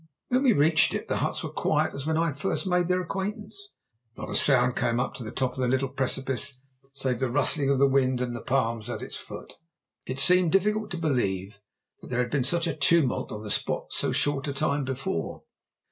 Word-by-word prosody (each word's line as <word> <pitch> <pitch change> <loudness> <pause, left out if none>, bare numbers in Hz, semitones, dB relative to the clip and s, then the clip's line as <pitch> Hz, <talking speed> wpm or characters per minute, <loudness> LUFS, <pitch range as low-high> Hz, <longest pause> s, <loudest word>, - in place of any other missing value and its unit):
When 255 +1 +2
we 260 -4 +4
reached 155 -1 +3
it - - -5
the - - 0
huts - - -2
were - - -4
as - - -25
quiet - - +1
as 140 +1 -5
when 160 0 +1
I 165 - +2
had 150 -5 -2
first 195 +6 -2
made 180 -2 +1
their 180 0 +1
acquaintance. 205 +2 -5 0.5
Not - - -6
a - - -3
sound 125 -3 +4
came 115 0 0
up - - -2
to 125 - -7
the 110 - -6
top 130 +1 -1
of 130 - -10
the 125 - +1
little 130 +1 0
precipice 135 0 -1 0.4
save 130 -3 -1
the 130 - 0
rustling 140 +3 +2
of 140 - +3
the 140 - +5
wind 130 -2 +2
in 125 -1 -2
the 120 - -6
palms 115 -4 -1
at - - -5
its - - -8
foot. - - -10 0.5
It 130 - -4
seemed 180 +4 +4
difficult 210 +2 +1
to 175 - -5
believe 100 - -1 0.4
that - - -11
there 125 - -2
had 120 - -7
been 140 -3 +1
such 170 +6 +2
a 165 -4 -2
tumult 150 -2 +2
on 105 0 -6
the 105 - -5
spot - - -1
so - - +2
short 145 0 0
a 140 - -2
time 140 -1 -1
before. 130 - -4
140 Hz, 230 wpm, -26 LUFS, 125-170 Hz, 0.5 s, the